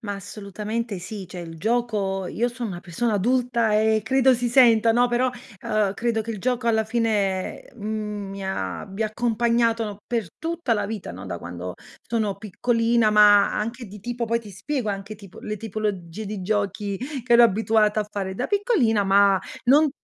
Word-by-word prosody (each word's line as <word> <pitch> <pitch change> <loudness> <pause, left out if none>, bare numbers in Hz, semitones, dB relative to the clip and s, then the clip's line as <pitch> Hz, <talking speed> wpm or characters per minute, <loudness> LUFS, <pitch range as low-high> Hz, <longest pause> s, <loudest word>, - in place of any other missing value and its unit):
Ma 205 -2 -4
assolutamente 210 +2 -5
sì, 190 +2 -7
cioè 180 +1 -9
il 165 -1 -8
gioco 210 -3 0
io 235 +6 -1
son 240 -1 -5
una 175 -3 -6
persona 205 +6 -1
adulta 235 +1 +1
e 220 +1 +3
credo 265 +2 +4
si 245 0 -1
senta, 230 -3 +5
no, 245 +2 +3
però, 245 +1 +1 0.3
ehm, 210 -2 0
credo 230 +1 0
che 225 +1 -5
il 215 - -4
gioco 245 +2 0
alla 220 -1 +2
fine, 210 -4 -1
mhmm, 210 -2 -4
mi 195 0 -6
abbia 190 - -3
accompagnato 230 -1 0
per 230 -6 -2
tutta 330 -6 -1
la 205 -2 -1
vita, 210 -3 -5
no, 95 +2 -9
da 85 - -4
quando 90 +1 -7 0.3
sono 215 -4 -1
piccolina, 230 +2 +1
ma 210 -1 +6
anche 230 +3 -4
di 205 +1 -11
tipo 240 +2 -3
poi 230 +1 +1
ti 220 -3 -11
spiego 230 +4 -3
anche 200 +2 -5
tipo 200 -3 -14
le 210 - -4
tipologie 210 -2 -4
di 200 -1 -5
giochi 200 0 -1 0.3
che 240 - 0
ero 235 0 +8
abituata 220 -1 +3
a 210 - -3
fare 195 -2 -4
da 245 - -2
piccolina, 385 - +2
ma 195 0 +4 0.2
non 290 +4 +5
215 Hz, 175 wpm, -24 LUFS, 200-235 Hz, 0.3 s, ero